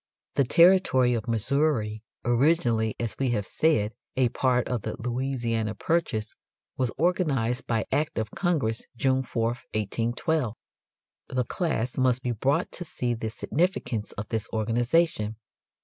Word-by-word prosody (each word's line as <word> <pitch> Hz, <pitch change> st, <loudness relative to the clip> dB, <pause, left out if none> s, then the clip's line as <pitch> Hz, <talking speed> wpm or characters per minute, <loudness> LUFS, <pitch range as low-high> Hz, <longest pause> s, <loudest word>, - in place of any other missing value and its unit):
The 140 Hz, -, +3 dB
territory 165 Hz, -6 st, +5 dB
of 115 Hz, -3 st, -2 dB
Missouri, 115 Hz, -1 st, +1 dB, 0.2 s
originally 120 Hz, -4 st, +2 dB
as 115 Hz, -2 st, -2 dB
we 135 Hz, -2 st, +1 dB
have 100 Hz, -, -3 dB
said 115 Hz, -9 st, +1 dB, 0.2 s
a 130 Hz, -2 st, +4 dB
part 125 Hz, 0 st, +1 dB
of 125 Hz, -3 st, -1 dB
the -, -, -4 dB
Louisiana 120 Hz, -3 st, -1 dB
Purchase, 110 Hz, -6 st, -1 dB, 0.4 s
was 130 Hz, -3 st, 0 dB
organized 140 Hz, -8 st, +1 dB
by 115 Hz, -2 st, 0 dB
act 150 Hz, +1 st, 0 dB
of 110 Hz, -1 st, -2 dB
Congress 145 Hz, -, 0 dB
June 130 Hz, +2 st, +2 dB
4, 115 Hz, -3 st, -1 dB, 0.3 s
1812. 120 Hz, -, -1 dB, 0.7 s
The 130 Hz, -1 st, 0 dB
class 130 Hz, -4 st, -2 dB
must 130 Hz, 0 st, +2 dB
be 125 Hz, -, 0 dB
brought 130 Hz, +5 st, 0 dB
to 175 Hz, -, -4 dB
see 125 Hz, -7 st, -2 dB
the 110 Hz, -1 st, -3 dB
significance 125 Hz, -, -1 dB
of 105 Hz, +1 st, -6 dB
this 110 Hz, -1 st, -1 dB
organization. 115 Hz, +1 st, +1 dB
120 Hz, 135 wpm, -27 LUFS, 110-140 Hz, 0.7 s, territory